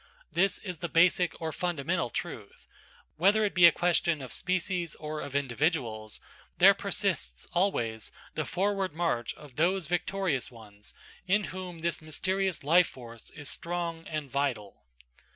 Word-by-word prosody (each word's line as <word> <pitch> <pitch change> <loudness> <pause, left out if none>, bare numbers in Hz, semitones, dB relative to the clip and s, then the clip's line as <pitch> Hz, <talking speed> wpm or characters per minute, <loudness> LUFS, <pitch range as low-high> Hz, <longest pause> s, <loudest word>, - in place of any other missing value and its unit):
This 195 +3 +2
is 180 -6 -7
the 170 - -3
basic 175 0 +3
or 160 -1 -3
fundamental 170 -5 -1
truth,–whether 200 +6 -2
it 205 - -1
be 175 -1 +9
a - - +7
question 170 -1 +2
of 130 -3 -6
species 180 -2 -1
or 155 0 -5
of 140 -1 -7
individuals, 125 -5 -1 0.4
there - - +8
persists - - -2
always 115 - 0 0.2
the - - -1
forward 195 -3 0
march 160 -9 -1
of 145 -4 -14
those 180 +3 +2
victorious 175 -3 -1
ones 105 -3 -11 0.3
in 205 +3 +3
whom 180 -3 -7
this 170 0 0
mysterious 185 +3 -1
life 170 +4 +5
force 115 -3 -10
is 145 -2 -7
strong 170 -1 -3
and 150 -4 -4
vital. 130 -8 -2
165 Hz, 140 wpm, -29 LUFS, 140-180 Hz, 0.4 s, be